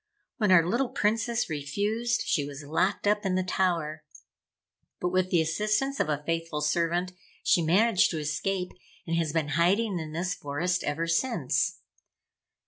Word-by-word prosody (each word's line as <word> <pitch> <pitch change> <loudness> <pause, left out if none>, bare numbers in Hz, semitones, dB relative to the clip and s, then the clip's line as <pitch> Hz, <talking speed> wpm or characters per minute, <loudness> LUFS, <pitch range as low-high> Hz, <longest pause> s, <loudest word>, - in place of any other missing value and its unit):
When 210 -6 +2
our 170 -3 +6
little 240 +6 0
Princess 225 +3 0
refused, 205 +11 -1
she 145 - +1
was 140 0 -7
locked 180 +9 0
up 210 0 +2
in 190 -2 0
the 185 - +1
tower. 170 -4 -1 1.0
But, 180 - 0
with 185 0 +1
the 170 -3 +3
assistance 215 - 0
of - - +1
a 150 -1 -1
faithful 165 -2 -2
servant, 170 +4 0 0.3
she 175 - +4
managed 190 +5 +4
to 165 - -3
escape, 180 +5 -2 0.3
and 165 - -1
has 165 -2 0
been 155 -2 -1
hiding 180 +6 +2
in 155 -1 -6
this 175 +3 -2
forest 165 +6 -2
ever 155 +3 -1
since. 230 +10 0
175 Hz, 155 wpm, -28 LUFS, 160-205 Hz, 1.0 s, our